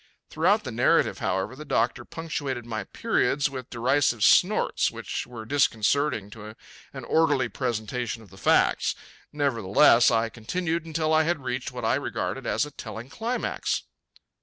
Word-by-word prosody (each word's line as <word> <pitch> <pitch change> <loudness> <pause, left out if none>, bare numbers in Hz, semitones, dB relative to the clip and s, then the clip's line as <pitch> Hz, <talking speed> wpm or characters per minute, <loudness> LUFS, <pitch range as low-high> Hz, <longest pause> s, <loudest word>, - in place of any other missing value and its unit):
Throughout - - +2
the - - -5
narrative, - - +2
however, 95 +7 -2
the 150 - -9
doctor 120 -4 0
punctuated 145 -7 -4
my 110 -2 -4
periods 140 0 0
with 130 -2 -7
derisive 120 -1 +1
snorts - - +4
which - - -5
were 115 -3 -9
disconcerting 120 -3 +1
to 110 0 -10 0.4
an - - -8
orderly 145 -6 +2
presentation 120 -1 -3
of 105 - -18
the 95 - -14
facts. - - +2 0.4
Nevertheless, 120 -3 +4
I 115 -1 +1
continued 165 +9 -3
until 160 0 0
I 155 - +5
had 160 -3 -1
reached 125 +2 -3
what 125 -2 -5
I 115 - +2
regarded 135 -2 -3
as - - +1
a 150 - -10
telling 115 -2 -8
climax. 235 - -2
125 Hz, 150 wpm, -26 LUFS, 115-150 Hz, 0.4 s, I